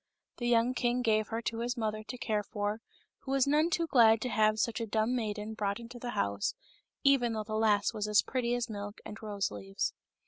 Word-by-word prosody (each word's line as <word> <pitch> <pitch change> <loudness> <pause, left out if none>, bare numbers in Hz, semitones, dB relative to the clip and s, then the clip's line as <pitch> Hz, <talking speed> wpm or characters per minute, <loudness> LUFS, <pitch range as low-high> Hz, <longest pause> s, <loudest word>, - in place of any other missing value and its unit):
The 240 - -2
young 240 +1 +3
king 245 0 0
gave 215 -2 +2
her 230 +1 -3
to 225 0 -2
his 245 +2 -2
mother 215 -1 -2
to 250 +3 -7
care 215 -3 0
for, 205 +1 -3 0.4
who - - -11
was 270 -1 +4
none 300 +4 +3
too 335 0 +1
glad 230 -7 +5
to 250 - -2
have 215 0 +3
such 230 +1 0
a 225 - -2
dumb 220 +3 +1
maiden 215 -2 -3
brought 200 0 -2
into 235 +1 -9
the 245 - -5
house, 100 0 0 0.5
even 265 -4 +4
though 215 -1 -2
the 215 +1 -7
lass 215 -1 +2
was 210 -1 -2
as 210 -1 +4
pretty 245 -2 -1
as 245 0 -1
milk 205 -2 -6
and 215 - -8
rose 205 -2 -2
leaves. 95 -1 -3
220 Hz, 220 wpm, -31 LUFS, 210-245 Hz, 0.5 s, glad